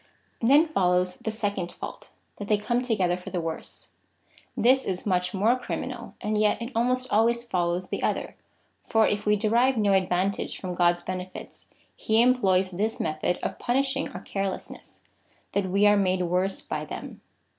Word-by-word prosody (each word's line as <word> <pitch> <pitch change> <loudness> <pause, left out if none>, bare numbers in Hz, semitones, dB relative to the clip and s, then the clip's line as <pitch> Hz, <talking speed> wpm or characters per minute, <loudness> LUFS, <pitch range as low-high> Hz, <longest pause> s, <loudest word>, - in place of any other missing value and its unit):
Then 280 +7 +6
follows 180 - +1
the - - -4
second 205 -5 -3
fault - - -8
— - - -43
that 205 - -6
they 210 - +3
come 240 +4 0
together 200 -8 +1
for 180 - -8
the 180 - -2
worse. 165 -1 -6 0.7
This 260 +3 +4
is 185 -1 -3
much 180 -3 +1
more 215 +5 +3
criminal, 245 - -5
and 210 0 0
yet 210 0 +2
it 235 +2 -5
almost 255 +2 0
always 235 +2 +3
follows 180 -4 -1
the - - -3
other, - - -1 0.5
for 225 -1 +4
if 205 0 -2
we 210 - +5
derive 235 +5 +2
no 205 -2 +3
advantage 190 +1 0
from 185 -1 -4
God's 175 0 +2
benefits, 185 0 -7 0.3
he 220 +1 +1
employs 195 -7 +3
this 210 +5 -2
method 155 +3 -1
of - - -3
punishing 270 +2 0
our - - -8
carelessness 195 -1 -5 0.2
— - - -37
that 200 -1 0
we 200 +3 +3
are 205 0 +6
made 185 -2 +1
worse 180 +2 0
by - - -4
them. - - -8
200 Hz, 175 wpm, -26 LUFS, 180-230 Hz, 0.7 s, Then